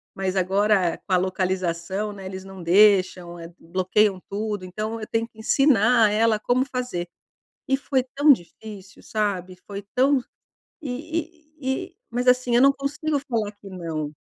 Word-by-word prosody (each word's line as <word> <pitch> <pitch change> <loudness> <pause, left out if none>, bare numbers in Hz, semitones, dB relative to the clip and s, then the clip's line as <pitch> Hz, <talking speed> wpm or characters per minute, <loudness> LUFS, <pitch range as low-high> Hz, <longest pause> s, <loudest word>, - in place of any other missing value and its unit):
mas 190 0 -2
agora 190 -1 +2
com - - -9
a 185 - +6
localização, 185 +1 -2
né, 195 -1 -10
eles 190 0 -7
não 190 -2 -10
deixam, 185 -2 +4
eh, 165 0 -9
bloqueiam 185 +3 +1
tudo 205 -1 -3
então 215 +5 -4
eu 215 - -6
tenho 225 0 -1
que 220 - -30
ensinar 230 -2 +4
ela 220 0 +3
como 245 +4 +1
fazer. 250 -10 -4 0.6
E 270 0 +1
foi 265 -2 0
tão 290 +1 +6
difícil 200 +1 -10
sabe. 190 -4 -2
Foi 200 0 -6
tão 265 +1 +4 0.6
e 315 +4 -5 0.2
e 265 +6 -1
e 355 - -43
mas 245 +2 -2
assim, 250 -1 +3
eu - - +5
não 275 - +7
consigo 290 +2 -2
falar 230 -7 -2
que 205 -1 -14
não. 160 -5 -5
210 Hz, 160 wpm, -24 LUFS, 185-250 Hz, 0.6 s, não